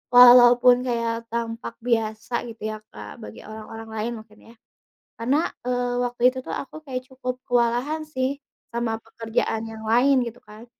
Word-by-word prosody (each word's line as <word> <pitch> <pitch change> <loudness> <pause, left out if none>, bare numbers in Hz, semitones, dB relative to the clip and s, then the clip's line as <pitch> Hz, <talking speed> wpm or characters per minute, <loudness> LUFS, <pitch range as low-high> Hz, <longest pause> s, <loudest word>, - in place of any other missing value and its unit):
walaupun 245 0 +9
kayak 230 -1 0 0.2
tampak 230 0 -4
biasa 220 -1 -1 0.2
gitu 225 - -12
ya, 215 - -5
Kak, 105 0 -10
bagi 105 +1 -10
orang-orang 220 +1 -9
lain 220 +2 -2
mungkin 215 -1 -17
ya, - - -16 0.7
karena, 260 +6 +2 0.3
eee, 245 0 0
waktu 245 0 -4
itu - - -3
tuh - - -5
aku 275 - -7
kayak 255 -2 -4
cukup 255 -1 -4
kewalahan 245 +6 +1
sih, 275 -2 -2 0.4
sama 225 -2 -1
pekerjaan 225 0 -2
yang 220 0 -9
lain 245 +5 +4
gitu 235 +2 -9
kan. 215 +2 -13
235 Hz, 155 wpm, -24 LUFS, 225-250 Hz, 0.7 s, walaupun